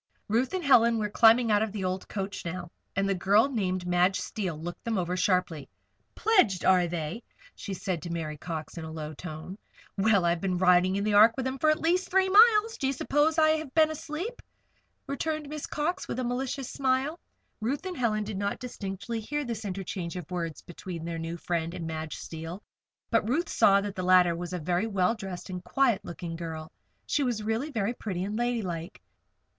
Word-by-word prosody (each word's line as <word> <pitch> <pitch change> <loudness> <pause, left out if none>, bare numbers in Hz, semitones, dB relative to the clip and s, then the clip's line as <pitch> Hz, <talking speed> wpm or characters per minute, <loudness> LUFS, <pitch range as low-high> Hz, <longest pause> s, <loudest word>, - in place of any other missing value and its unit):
Ruth 240 - +1
and 370 - -2
Helen 235 -4 +5
were 210 -2 -2
climbing 230 +1 +5
out 205 0 +4
of 220 -1 -1
the 205 -2 -4
old 185 +1 -3
coach 195 0 -4
now, 175 0 -5 0.2
and 195 0 +1
the 195 - +2
girl 200 +6 +4
named 185 -7 -1
Madge 180 +2 +2
Steele 185 -3 -3
looked 175 +2 -7
them 230 -3 -1
over 180 0 -1
sharply. 180 -5 0 0.5
"Pledged, 370 - +3
are 180 -2 +5
they?" 170 +5 -4 0.3
she 195 - -6
said 180 -3 -3
to 170 - -6
Mary 160 -2 -3
Cox, 160 +2 -6
in - - -6
a 160 - -7
low 155 -1 -6
tone. 160 +5 -8 0.4
"Well! 200 -3 +4
I've 170 0 +1
been 185 -2 0
riding 180 +1 +4
in 200 - 0
the 210 0 +1
Ark 215 +3 +7
with 260 - -2
them 260 +1 -3
for 310 +2 +4
the - - -11
last 355 +3 +1
three 380 0 +3
miles. 440 +2 +6
Do 270 - 0
you 270 - +1
suppose 295 +4 +1
I 310 -1 +5
have 310 -3 -1
been 315 -1 +5
asleep?" 320 +10 -5 0.6
returned 300 +2 -3
Miss 300 0 -5
Cox, 340 +5 -2
with - - -4
a 255 - -1
malicious 255 +2 -3
smile. 270 +4 0 0.4
Ruth 270 - -2
and 370 -1 -4
Helen 215 -5 0
did 205 -2 -5
not 200 0 -1
distinctly 200 -2 -5
hear 295 +7 -3
this 225 -3 -4
interchange 185 -3 -4
of 180 -2 -7
words 165 -3 -4
between 175 -2 -7
their 165 -1 -4
new 165 +1 -4
friend 170 0 -2
and 170 - -5
Madge 160 -1 -4
Steele; 165 +4 -7 0.5
but 230 -2 +2
Ruth 325 +8 0
saw 200 0 +5
that 205 0 -4
the 185 - -4
latter 180 -2 +5
was 175 +1 -5
a 180 - -2
very 175 +5 0
well 190 -2 +2
dressed 190 -4 -7
and 180 0 -5
quiet 235 +4 +2
looking 170 0 -6
girl 160 -2 -6 0.3
that - - -13
she 295 - +2
was 240 -5 -1
really 225 +7 -1
very 225 -4 -1
pretty 190 -6 -4
and 205 +2 -3
ladylike. 210 -8 -2
200 Hz, 205 wpm, -28 LUFS, 175-255 Hz, 0.6 s, Ark